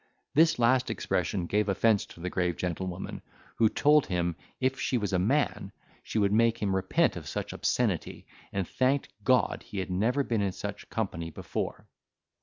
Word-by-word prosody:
This 160 +2 +5
last 125 +2 +3
expression 95 -4 -1
gave 105 +3 +1
offence 105 +2 +2
to - - -14
the 90 +2 -3
grave 90 -2 0
gentlewoman, 90 +1 -4 0.4
who 110 -1 +5
told 150 +4 +4
him, 85 -2 0 0.2
if 130 +1 0
she 125 - +1
was 105 -4 -2
a 90 - +3
man, 135 +11 0 0.3
she - - -4
would 100 -1 +3
make 115 +1 +4
him 100 -2 0
repent 95 0 +2
of - - -7
such - - -4
obscenity, - - -1 0.3
and 95 -3 -2
thanked 130 +2 +1
God 130 +4 +2
she 100 - -6
had 95 -1 -3
never 115 +10 +1
been 115 -5 0
in 100 -2 0
such 100 +1 -6
company 90 -7 -3
before. 80 - -4
105 Hz, 175 wpm, -29 LUFS, 95-125 Hz, 0.4 s, This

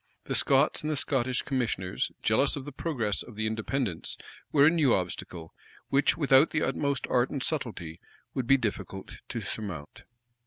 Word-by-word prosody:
The - - -3
Scots 140 +4 +4
and 155 - -3
the 155 - 0
Scottish 130 -3 0
commissioners, 115 -9 -1
jealous 110 +6 +3
of 140 -2 -6
the 145 - -6
progress 125 -9 -1
of 120 - -10
the 110 +1 -2
Independents, 110 -3 -2 0.3
were 140 -2 +6
a - - +8
new 155 -7 +4
obstacle, 90 -2 -5 0.4
which, 140 +3 +3
without 140 -1 +5
the 155 - 0
utmost 140 -3 0
art 125 +1 +2
and 135 -2 -3
subtlety, 115 - -2
it 80 - -16 0.3
would 130 -3 -2
be 135 - +6
difficult 100 -5 -4
to - - -3
surmount. 90 -9 -6
130 Hz, 170 wpm, -28 LUFS, 105-140 Hz, 0.4 s, a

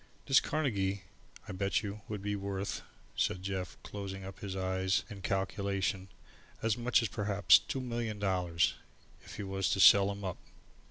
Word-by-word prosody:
"This 135 -1 +6
Carnegie, 100 -10 -1 0.4
I - - -5
bet 100 +2 0
you, 105 0 -5
would 105 -2 -4
be 105 0 -1
worth," 100 0 -3 0.3
said 90 - 0
Jeff, 95 -1 -4
closing 95 -1 -6
up 95 - -9
his 95 -2 -5
eyes 95 0 0
in 100 -2 -8
calculation, 95 0 -1 0.6
"as 115 -2 +2
much 120 0 +2
as - - +1
perhaps 100 -4 +4
two 135 - -4
million 120 -3 -3
dollars, 90 -4 +1 0.5
if - - -10
you 100 - -4
was 95 0 0
to 95 - 0
sell 100 +1 +8
him 100 0 -7
up. 95 - -4
100 Hz, 165 wpm, -32 LUFS, 95-105 Hz, 0.6 s, sell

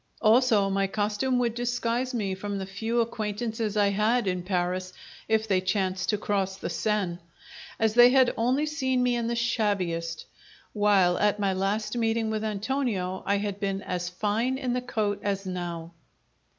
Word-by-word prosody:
Also, 225 -2 +4
my 195 0 +1
costume 210 +6 0
would 240 -2 +1
disguise 240 +1 -1
me 210 -6 -2
from 200 +1 -4
the 190 - -4
few 225 +5 -1
acquaintances 220 -1 -3
I 205 -1 +4
had 215 +4 +1
in 180 -1 -1
Paris 185 0 -2 0.3
(if 220 0 +1
they 190 -3 +2
chanced 185 -1 -1
to 210 - +2
cross 195 -2 -1
the - - -5
Seine), 200 -5 -1 0.6
as 220 -1 +2
they 240 +1 +8
had 260 -1 +4
only 255 +6 +1
seen 260 -4 0
me 245 -1 +2
in 235 -1 -1
the 235 - -1
shabbiest; 190 -8 -1 0.5
while, 200 -4 +3
at 210 0 +2
my 195 -2 +1
last 210 +4 -1
meeting 225 -1 0
with 215 0 -2
Antonio, 210 -4 -2
I 200 - +3
had 200 -1 -3
been 195 -1 -2
as 175 -1 -3
fine 215 +7 -1
in 255 -2 -2
the 250 - -1
coat 215 -5 -1
as 195 -1 -2
now. 175 -2 -5
210 Hz, 170 wpm, -27 LUFS, 190-235 Hz, 0.6 s, they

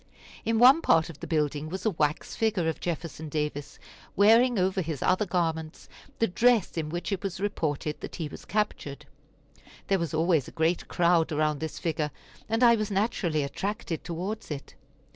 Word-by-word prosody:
In 225 0 +1
one 260 +7 +7
part 165 - +3
of 145 - -16
the - - -7
building 150 -1 -1
was 190 +5 -5
a 220 - +3
wax 150 -3 -1
figure 220 -7 +1
of 160 - -2
Jefferson 165 -2 -4
Davis, 150 -1 -3 0.4
wearing 230 +4 +5
over 190 0 +1
his 155 -5 -4
other 195 +3 +2
garments 160 -3 -2 0.3
the 225 - +3
dress 225 +1 +2
in 160 -2 -2
which 175 +5 -4
it 195 - -1
was 195 -3 -4
reported 155 -7 -2
that - - -7
he 165 -4 -3
was - - -10
captured. 150 -9 -2 0.8
There 195 -1 +3
was 165 -2 -2
always 160 -3 +2
a - - -9
great 165 +2 +1
crowd 170 -2 +2
around 150 -1 +1
this 160 -1 -5
figure, 155 -2 -1 0.4
and 225 +3 +1
I 235 -1 +7
was 215 -1 -2
naturally 190 -7 0
attracted 195 +3 -4
towards 185 +6 -5
it. 145 -3 -6
170 Hz, 180 wpm, -27 LUFS, 155-205 Hz, 0.8 s, one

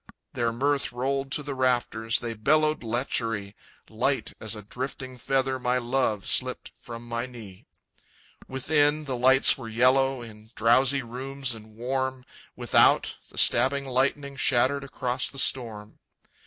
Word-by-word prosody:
Their 120 -1 0
mirth 140 +4 -1
rolled 135 +2 -2
to 150 - -2
the 140 0 -5
rafters, 120 -3 0
They 115 -1 -4
bellowed 155 +7 +2
lechery; 115 -4 -2 0.3
Light - - -1
as - - -4
a 105 - -9
drifting 130 +3 -6
feather 130 +1 0
My 125 0 0
love 120 -4 -1
slipped - - +2
from 120 0 -10
my 120 +1 -3
knee. 110 -7 -12 0.8
Within, 145 +3 +1
the 135 -2 -3
lights 130 +2 +4
were 115 -3 -7
yellow 130 +2 +2
In 110 -1 -13
drowsy 130 +4 +3
rooms 130 +2 -4
and 110 -1 -13
warm; 130 +2 -3 0.3
Without, - - +3
the - - -16
stabbing 135 +3 +3
lightning 140 +2 -1
Shattered 130 +3 +2
across 130 -2 -1
the 135 - -12
storm. 110 -6 0
125 Hz, 140 wpm, -26 LUFS, 115-135 Hz, 0.8 s, lights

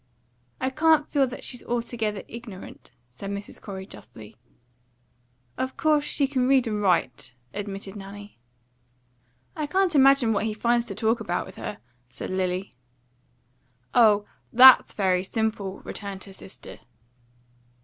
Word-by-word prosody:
"I 260 - -1
can't 310 +1 +3
feel 275 -3 +2
that 255 - -8
she's 245 - -5
altogether 230 -4 -3
ignorant," 230 -5 -10 0.2
said 195 +11 -8
Mrs. 200 +1 -6
Corey 190 -2 -7
justly. 110 - -12 1.2
"Of 260 0 -3
course 305 -2 +3
she 290 -1 +1
can 260 -2 0
read 265 -2 +4
and 210 -2 -2
write," 130 -9 0 0.2
admitted 200 -1 -6
Nanny. 205 - -10 1.2
"I 305 -1 -3
can't 375 +2 +1
imagine 275 -4 +5
what 210 +1 0
he 215 -1 -2
finds 235 +2 +1
to - - -6
talk 225 +1 +1
about 175 -5 -2
with - - -13
her," 210 - -5 0.3
said - - -7
Lily. 185 -2 -2 1.2
"Oh, 210 -3 +5 0.3
THAT'S 255 +2 +8
very 185 -3 +2
simple," 205 -2 -3
returned 200 -2 -6
her 195 - -12
sister. 190 - -12
215 Hz, 135 wpm, -25 LUFS, 195-260 Hz, 1.2 s, THAT'S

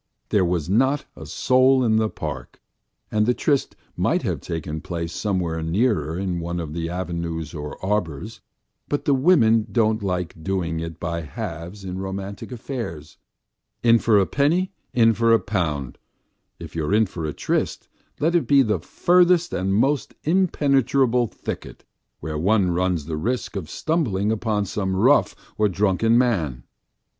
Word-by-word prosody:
There 100 - +3
was 85 -3 0
not 130 +9 +2
a - - -10
soul 130 +1 +3
in 110 -2 +3
the 110 -1 +2
park, - - -7 0.5
and 105 0 +2
the 125 - +3
tryst 140 -3 0 0.2
might - - +1
have - - -2
taken 80 -1 -4
place 85 -2 -4
somewhere 90 -5 -1
nearer 85 - 0
in 90 -2 -2
one 85 +1 -3
of 80 -3 -5
the 85 0 -3
avenues 85 -3 -4
or 75 -2 -6
arbours, 90 -8 -2 0.5
but 145 - -2
women 130 -6 +4
don't 110 -2 +2
like 90 -4 -3
doing 85 -3 -1
it 80 0 -6
by 85 -1 -3
halves 85 +3 -7
in 95 0 -5
romantic 95 +3 -6
affairs; 110 - -6 0.7
in 115 -1 +6
for 110 -2 +3
a 100 - +4
penny, 165 - +1 0.2
in 115 -2 +4
for 115 +1 +2
a 115 - +5
pound 80 - -2 0.6
if - - -10
you 80 - -1
are 100 - +1
in 110 +1 +4
for 85 -4 -6
a - - -2
tryst, - - -2 0.3
let 160 +4 +1
it 175 - +2
be 140 -1 +6
in 130 - +1
the 105 - +1
furthest 175 -1 +3
and 95 +1 -1
most 135 +6 +1
impenetrable 140 -8 +2
thicket, - - -7 0.4
where 75 0 -4
one 95 +1 +2
runs 90 -3 0
the 80 -1 -4
risk 120 +8 -2
of 90 -6 -5
stumbling 110 - 0
upon 110 -2 0
some 95 -1 -2
rough 125 +10 +4 0.2
or 105 -1 +4
drunken 105 +4 +2
man. 85 - 0
100 Hz, 160 wpm, -23 LUFS, 85-120 Hz, 0.7 s, in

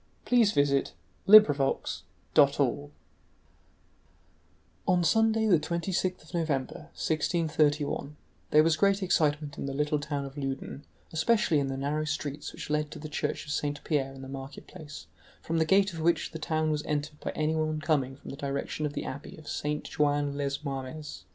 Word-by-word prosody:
*URBAIN 145 - +3 0.3
GRANDIER—1634* 170 -10 +6 0.4
CHAPTER - - +5
I 70 - -2 2.0
On 180 -1 +3
Sunday, 225 +3 +3
the 185 -7 +5
26th 175 +3 -2
of 160 - -17
November, 155 -6 -2
1631, 150 -2 0 0.3
there 155 +1 +6
was 160 -1 +2
great 200 +3 +3
excitement 150 -4 +1
in - - -3
the 135 - -4
little 150 +1 +1
town 145 -1 -3
of 135 0 -9
Loudun, 135 +1 -5 0.3
especially 165 -2 +3
in 140 - 0
the 135 0 -3
narrow 145 +3 -1
streets 150 -1 -4
which - - -7
led 150 0 0
to - - -9
the 155 +1 -7
church 150 - -2
of 150 - -6
Saint 145 0 -2
Pierre 140 -4 0
in 135 - -10
the - - -7
marketplace, 140 +3 -9 0.4
from 165 0 -1
the 160 - +3
gate 195 +2 +3
of 165 - -6
which 170 +1 +1
the 160 - -6
town 155 0 0
was 150 -1 0
entered 150 0 -2
by - - -4
anyone 155 0 0
coming 140 -4 0
from 140 - -10
the 140 - -8
direction 140 +2 -2
of 145 - -7
the - - -4
abbey 145 +7 -7
of 155 -1 -14
Saint 150 0 -2
Jouin 145 -1 0
les 140 0 -2
Marmes. 140 +2 -6
150 Hz, 170 wpm, -29 LUFS, 140-160 Hz, 2.0 s, GRANDIER—1634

